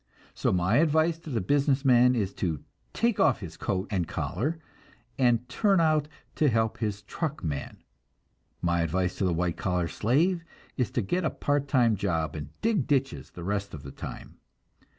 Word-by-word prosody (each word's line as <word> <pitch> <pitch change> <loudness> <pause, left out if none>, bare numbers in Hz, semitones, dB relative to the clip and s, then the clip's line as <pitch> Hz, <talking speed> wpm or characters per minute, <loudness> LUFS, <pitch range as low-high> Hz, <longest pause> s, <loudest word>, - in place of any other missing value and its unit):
So - - 0
my 90 +5 +2
advice 160 +1 +3
to 165 - -10
the 115 -6 -1
business 140 +5 +2
man 125 -1 +6
is 100 -4 -1
to 80 -6 -1 0.3
take 230 -2 0
off 135 -8 +3
his 85 -4 -7
coat 95 +3 -2
and 90 -5 0
collar 140 - -2 0.6
and 120 -2 +3
turn 195 - +2
out 155 -2 +3 0.3
and 150 - +5
help 110 -2 0
his 105 -1 -2
truck 155 - -4
man; 75 -4 -4 0.8
my 85 -1 +2
advice 90 +2 0
to 95 - +1
the 90 - +2
white 85 0 -1
collar 90 -6 0
slave 165 - +1 0.3
is 125 -5 0
to 120 - 0
get 180 - -1
a 155 - +2
part 145 -1 -1
time 120 -5 +3
job, 85 -6 -1
and 75 -1 -6
dig 215 - +1
ditches 135 -2 0
the 90 - -9
rest 100 -1 -2
of 70 - -10
the 70 - -8
time. - - -9
115 Hz, 180 wpm, -28 LUFS, 90-145 Hz, 0.8 s, man